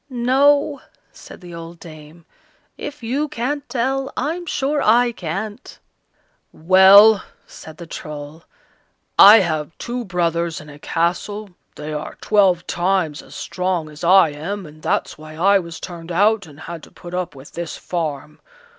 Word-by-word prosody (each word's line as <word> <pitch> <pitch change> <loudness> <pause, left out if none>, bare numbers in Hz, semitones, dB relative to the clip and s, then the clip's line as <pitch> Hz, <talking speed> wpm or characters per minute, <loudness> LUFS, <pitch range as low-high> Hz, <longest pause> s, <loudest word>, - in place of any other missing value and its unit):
"No," 280 +4 +2 0.3
said - - -14
the 175 -1 -11
old 165 0 -9
dame, 155 0 -13 0.5
"if 295 -3 -8
you 275 +6 -1
can't 285 +1 -4
tell, 265 +2 -1
I'm 335 +6 -3
sure 290 0 -1
I 240 +3 +4
can't." 205 - -6 0.7
"Well!" 190 +4 +7 0.2
said 160 -1 -12
the 170 - -9
Troll, 150 0 -8 0.8
"I 205 +2 +10
have 155 -3 -3
two 245 +1 -4
brothers 170 -4 -1
in 150 - -12
a 145 0 -13
castle; 185 +6 -2 0.2
they 150 +1 -6
are 150 0 -6
twelve 190 -5 +2
times 175 -4 -1
as - - -15
strong 180 -4 -3
as 150 +2 -12
I 185 -1 +6
am, 175 +7 -5
and 155 0 -14
that's - - -2
why 155 0 -11
I 195 +4 +4
was 170 -2 -8
turned 170 -2 -8
out 200 +2 +2
and 145 0 -15
had 170 0 -7
to - - -15
put 175 0 -12
up 180 -4 -3
with 135 +1 -13
this 170 -1 -6
farm. 155 -4 -5
180 Hz, 155 wpm, -20 LUFS, 160-225 Hz, 0.8 s, I